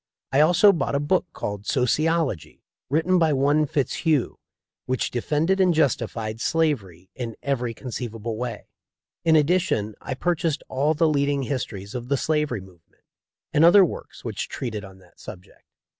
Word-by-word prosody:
I 135 - +3
also 175 +6 +6
bought 160 - -1
a - - +2
book 175 +5 +1
called 105 -5 -5
"Sociology," 150 - 0 0.3
written 165 +6 +2
by 160 -3 +3
one 145 +3 +2
Fitzhugh, 145 0 0 0.5
which 130 -1 -1
defended 155 +10 0
and 180 -3 +4
justified 115 -6 -1
slavery 110 - -1
in 115 -3 -5
every 125 -4 -1
conceivable 115 -3 -5
way. 120 -1 -5 0.6
In 160 -1 +4
addition 155 - +2
I 130 - -4
pur 175 +6 +1
chased 160 -2 -2
all 145 +4 +1
the 165 +2 +3
leading 140 -2 +1
histories 110 -7 -4
of 120 -1 -5
the 140 +1 +1
slavery 150 -7 0
move 90 -3 -16
ment, - - -36 0.5
and 150 - +4
other 185 +3 +8
works - - -8
which - - -4
treated 110 -6 -4
on 95 -1 -12
that 90 -2 -22
subject. 90 - -12
140 Hz, 160 wpm, -24 LUFS, 115-160 Hz, 0.6 s, other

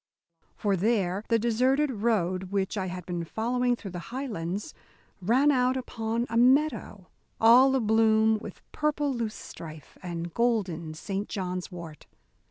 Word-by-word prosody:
For 200 -2 0
there 195 -1 0
the 230 - +3
deserted 255 +6 +2
road 200 -5 0
which 195 +1 -2
I 190 -2 -2
had 180 -1 -6
been 175 -2 -3
following 245 +7 0
through 205 -5 -9
the 175 - -5
Highlands 210 -8 -4 0.5
ran 255 +10 +4
out 255 -1 +2
upon 230 -2 -2
a 230 - -2
meadow 255 -6 +2 0.3
all 250 +4 +7
abloom 220 -2 +3
with 210 - -10
purple 295 -2 0
loose 230 -3 -3
strife 155 -3 -11
and 170 -2 -5
golden 185 -10 0
Saint 195 +5 -4
John's 185 -2 -4
wort. 170 -4 -10
220 Hz, 140 wpm, -27 LUFS, 185-245 Hz, 0.5 s, all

